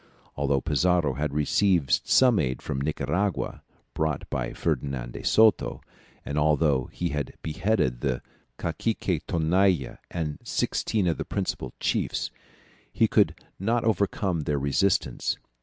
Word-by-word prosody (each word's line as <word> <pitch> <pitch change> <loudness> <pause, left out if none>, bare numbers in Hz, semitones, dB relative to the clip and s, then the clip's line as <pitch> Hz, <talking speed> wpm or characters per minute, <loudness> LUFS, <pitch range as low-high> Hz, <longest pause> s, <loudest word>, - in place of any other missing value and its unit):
Although 70 -1 +1
Pizarro 80 0 +2
had 75 +2 -2
received 85 0 +2
some 125 -5 +5
aid 65 -3 -1
from 65 - -3
Nicaragua, 80 +6 -1 0.3
brought 80 -3 -1
by - - -2
Ferdinand 65 -4 -2
de - - -7
Soto, 110 - +4 0.5
and 70 +1 -1
although 75 -3 +3
he 85 - -2
had 75 -3 -3
beheaded 80 - 0
the 65 -3 -1 0.3
cacique 95 -7 -1
Tonalla 85 -1 +2
and 80 -4 -3
sixteen 105 -4 0
of 85 -6 0
the - - -1
principal 65 -2 -3
chiefs, - - -1 0.6
he - - +3
could - - +3 0.2
not 115 +5 +1
overcome 100 -4 +1
their 75 -1 -1
resistance. 70 -1 +1
75 Hz, 125 wpm, -26 LUFS, 70-95 Hz, 0.6 s, some